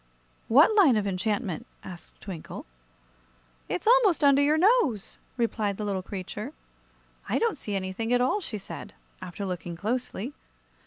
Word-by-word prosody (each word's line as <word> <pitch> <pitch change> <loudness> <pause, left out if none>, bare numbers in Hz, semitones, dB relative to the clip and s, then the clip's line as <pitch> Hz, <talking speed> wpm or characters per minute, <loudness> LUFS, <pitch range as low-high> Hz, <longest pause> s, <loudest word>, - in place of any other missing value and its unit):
"What 290 - +6
line 365 - +6
of 210 - 0
enchantment?" 200 -1 -2 0.2
asked 175 -2 -11
Twinkle. 180 -5 -8 1.0
"It's - - -3
almost 445 -9 +5
under 280 0 +6
your 295 +2 +3
nose," 330 - +2 0.2
replied 215 -4 0
the 210 - -3
little 195 -2 -1
creature. 205 +7 -6 0.8
"I - - +2
don't 460 -2 +1
see 210 -7 -5
anything 195 +4 -3
at 245 - +4
all," 260 +12 +1
she 240 - -5
said, 195 - -9 0.3
after 190 +3 -6
looking 175 -2 -5
closely. 240 - -3
225 Hz, 145 wpm, -27 LUFS, 195-290 Hz, 1.0 s, What